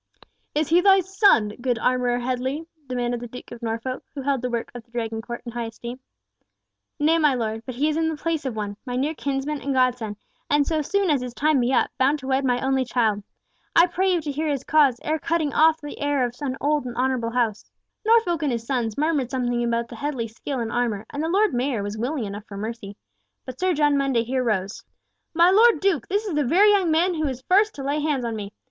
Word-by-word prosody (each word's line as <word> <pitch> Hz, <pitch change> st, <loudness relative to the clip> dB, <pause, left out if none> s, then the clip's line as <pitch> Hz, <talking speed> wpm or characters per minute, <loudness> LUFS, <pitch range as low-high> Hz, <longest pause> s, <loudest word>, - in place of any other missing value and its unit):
"Is 305 Hz, 0 st, +1 dB
he 340 Hz, +2 st, +5 dB
thy 390 Hz, 0 st, +6 dB
son, 380 Hz, -, +3 dB
good 245 Hz, -2 st, 0 dB
Armourer 250 Hz, +1 st, +1 dB
Headley?" 255 Hz, +5 st, -2 dB, 0.2 s
demanded 245 Hz, -1 st, -2 dB
the 240 Hz, -, -7 dB
Duke 250 Hz, +2 st, -11 dB
of 240 Hz, -, -9 dB
Norfolk, 230 Hz, +3 st, -3 dB
who 275 Hz, -, -5 dB
held 275 Hz, -2 st, 0 dB
the 250 Hz, -, -2 dB
work 235 Hz, -1 st, -3 dB
of 245 Hz, -1 st, -8 dB
the 235 Hz, -, -36 dB
Dragon 225 Hz, -2 st, -3 dB
court 235 Hz, +1 st, -7 dB
in 235 Hz, -, -5 dB
high 235 Hz, 0 st, -3 dB
esteem. 235 Hz, +2 st, -8 dB, 1.0 s
"Nay, 320 Hz, +2 st, +3 dB
my 300 Hz, -4 st, +3 dB
Lord 220 Hz, -2 st, -2 dB
Duke, 225 Hz, -, -14 dB
but 255 Hz, -, -5 dB
he 285 Hz, +5 st, +1 dB
is 310 Hz, 0 st, 0 dB
in 325 Hz, 0 st, +1 dB
the 315 Hz, -, -4 dB
place 325 Hz, 0 st, -2 dB
of 260 Hz, -4 st, -3 dB
one, 205 Hz, -1 st, -4 dB
my 245 Hz, -2 st, -4 dB
near 280 Hz, +5 st, 0 dB
kinsman 280 Hz, 0 st, -3 dB
and 275 Hz, -1 st, -2 dB
godson, 245 Hz, -5 st, +1 dB, 0.3 s
and 290 Hz, 0 st, +3 dB
so 315 Hz, 0 st, 0 dB
soon 385 Hz, +3 st, +1 dB
as 280 Hz, -4 st, +2 dB
his 250 Hz, -1 st, -6 dB
time 305 Hz, -1 st, +2 dB
be 245 Hz, +1 st, +1 dB
up, 265 Hz, -, +2 dB
bound 275 Hz, +3 st, +3 dB
to 270 Hz, -, -11 dB
wed 265 Hz, +1 st, +1 dB
my 250 Hz, -2 st, +1 dB
only 265 Hz, 0 st, +1 dB
child! 225 Hz, -4 st, 0 dB, 0.5 s
I 335 Hz, -, +8 dB
pray 375 Hz, +2 st, 0 dB
you 350 Hz, -2 st, +1 dB
to 295 Hz, -1 st, -4 dB
hear 310 Hz, +3 st, -2 dB
his 280 Hz, -3 st, -1 dB
cause, 280 Hz, -6 st, +3 dB
ere 310 Hz, +1 st, -1 dB
cutting 325 Hz, -2 st, -1 dB
off 320 Hz, 0 st, +4 dB
the 295 Hz, -1 st, -8 dB
heir 285 Hz, -3 st, +1 dB
of 240 Hz, -, -4 dB
an 265 Hz, -2 st, -2 dB
old 295 Hz, -1 st, +1 dB
and 245 Hz, -2 st, -6 dB
honourable 250 Hz, -2 st, 0 dB
house." 230 Hz, -3 st, -1 dB, 0.3 s
Norfolk 440 Hz, -7 st, +3 dB
and 295 Hz, -3 st, 0 dB
his 230 Hz, -1 st, -3 dB
sons 235 Hz, -4 st, -2 dB
murmured 295 Hz, -4 st, +1 dB
something 245 Hz, -2 st, -1 dB
about 235 Hz, 0 st, 0 dB
the -, -, -10 dB
Headley 280 Hz, -5 st, -3 dB
skill 250 Hz, +4 st, -5 dB
in 225 Hz, -1 st, -3 dB
armour, 230 Hz, -4 st, -1 dB
and 285 Hz, -, -3 dB
the 320 Hz, -, -1 dB
Lord 400 Hz, 0 st, +2 dB
Mayor 245 Hz, -3 st, -1 dB
was 205 Hz, +1 st, -4 dB
willing 250 Hz, +4 st, -2 dB
enough 205 Hz, +1 st, -7 dB
for 200 Hz, -, -8 dB
mercy, 210 Hz, -1 st, -6 dB, 0.5 s
but 255 Hz, 0 st, -8 dB
Sir 370 Hz, -2 st, +1 dB
John 295 Hz, -1 st, +3 dB
Mundy 270 Hz, -4 st, +1 dB
here 255 Hz, +2 st, -1 dB
rose: 200 Hz, -4 st, -2 dB, 0.5 s
"My 340 Hz, +2 st, +6 dB
Lord 455 Hz, +4 st, +6 dB
Duke, 375 Hz, -, +1 dB
this 410 Hz, +3 st, -1 dB
is 395 Hz, -, -3 dB
the 295 Hz, -1 st, +1 dB
very 380 Hz, +11 st, +5 dB
young 390 Hz, -4 st, +3 dB
man 340 Hz, +4 st, +3 dB
who 315 Hz, -2 st, -1 dB
was 260 Hz, -2 st, -4 dB
first 415 Hz, +6 st, +3 dB
to 275 Hz, -, -6 dB
lay 285 Hz, +2 st, 0 dB
hands 290 Hz, -5 st, -1 dB
on 230 Hz, -1 st, -2 dB
me! 205 Hz, -2 st, -6 dB
265 Hz, 240 wpm, -24 LUFS, 240-310 Hz, 1.0 s, I